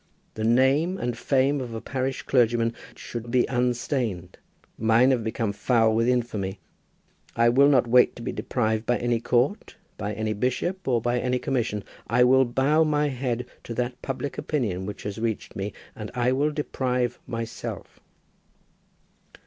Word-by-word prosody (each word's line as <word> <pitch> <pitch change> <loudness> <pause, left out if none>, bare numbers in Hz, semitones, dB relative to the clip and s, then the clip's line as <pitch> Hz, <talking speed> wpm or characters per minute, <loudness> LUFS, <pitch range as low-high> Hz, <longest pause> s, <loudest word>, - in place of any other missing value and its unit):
The 110 - -4
name 135 +10 +3
and 120 -5 -2
fame 135 +3 +1
of 120 -3 -6
a - - -3
parish 130 +2 -3
clergyman 120 -2 +2 0.2
should 120 0 -7
be 125 0 +3
unstained. 120 - -2 0.4
Mine 115 +4 +4
have 125 -3 +1
become 110 -1 -2
foul 110 +1 +2
with 115 +1 +2
infamy. 110 -6 -1 0.8
I 115 0 +4
will 140 +4 +5
not 130 -4 +4
wait 125 +1 +4
to 120 - -9
be - - -2
deprived 110 -2 -1
by 120 - +2
any 120 -1 0
court, 125 - 0 0.2
by 105 0 -3
any 110 +1 -2
bishop, 135 - -2
or 120 -3 +2
by 120 0 +1
any 125 +1 0
commission. 120 -6 -1 0.2
I 125 +2 +4
will 130 +1 +5
bow 135 +6 +2
my 150 -1 +1
head 125 -2 -2 0.2
to 115 - -6
that 125 +1 -3
public 135 +1 -4
opinion 100 - -2
which 105 - -7
has 105 +1 -5
reached 110 -2 -3
me, 100 +2 -3 0.2
and 105 -1 -6
I 125 0 +2
will 140 +3 +2
deprive 125 -5 -1
myself." 115 -1 -6
120 Hz, 160 wpm, -25 LUFS, 115-130 Hz, 0.8 s, will